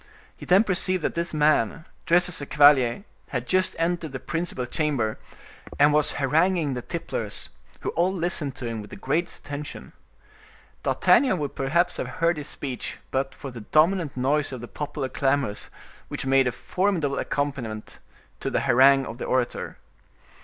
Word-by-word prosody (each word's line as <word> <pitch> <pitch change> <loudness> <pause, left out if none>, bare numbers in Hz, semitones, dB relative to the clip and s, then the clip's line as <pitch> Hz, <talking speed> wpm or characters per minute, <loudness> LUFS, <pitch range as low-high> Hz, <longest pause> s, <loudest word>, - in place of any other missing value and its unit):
He - - -11
then 190 +4 +6
perceived 185 -3 +1
that - - 0
this 170 0 -2
man, 150 -1 +2 0.2
dressed 175 +1 +5
as 175 -4 -2
a 140 - -6
cavalier, 145 0 +5 0.2
had 120 -2 -3
just 185 +4 +1
entered 165 -3 -1
the 135 - -4
principal 165 -6 -3
chamber, 125 -5 -1 0.6
and 145 +1 +5
was 150 0 +2
haranguing 155 +2 +2
the 125 - -3
tipplers, - - -4 0.3
who - - -2
all 175 +3 +1
listened 170 -7 -2
to 130 - -7
him 115 -2 -3
with 105 - -11
the - - -9
greatest 160 +6 -2
attention. 145 +1 -7 0.9
D'Artagnan 260 -9 +3
would 145 -3 -3
perhaps 170 +6 +1
have - - -3
heard 170 0 +2
his 150 -1 -4
speech 135 -4 -5
but 135 0 -1
for 135 - -8
the 120 -2 -8
dominant 155 - +2
noise 145 +3 +1
of 130 -3 -6
the 120 - -7
popular 140 -1 -4
clamors, 135 -5 -1 0.4
which - - -5
made 135 -1 +4
a - - +1
formidable 170 - -1
accompaniment 130 -7 -3 0.4
to - - -2
the - - 0
harangue 135 +2 +5
of 115 - -8
the - - -3
orator. 125 -2 -1
145 Hz, 165 wpm, -25 LUFS, 130-170 Hz, 0.9 s, then